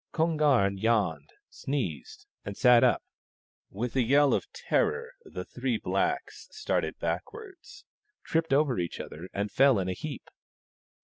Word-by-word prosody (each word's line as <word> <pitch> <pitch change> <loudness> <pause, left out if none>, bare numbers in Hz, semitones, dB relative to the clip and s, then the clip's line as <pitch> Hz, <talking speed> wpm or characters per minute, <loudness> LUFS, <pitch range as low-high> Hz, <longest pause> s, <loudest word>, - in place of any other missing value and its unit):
Kon 165 0 +1
garn 125 -11 +2
yawned, 100 -10 0 0.2
sneezed, 90 - -4 0.2
and 100 0 -7
sat 125 -1 +6
up. - - +3 0.7
With 115 +5 -4
a 130 - +3
yell 140 +4 +4
of - - -2
terror 465 +1 -1
the - - -7
three - - -2
blacks - - -2
started 435 - -2
backwards, 410 -6 -6 0.4
tripped 165 -1 -1
over 135 -4 +2
each 85 -1 -3
other, 85 +4 -8
and 100 +1 -3
fell 135 -4 +5
in 95 -2 -1
a 95 - -1
heap. 140 +9 -7
125 Hz, 140 wpm, -28 LUFS, 100-155 Hz, 0.7 s, sat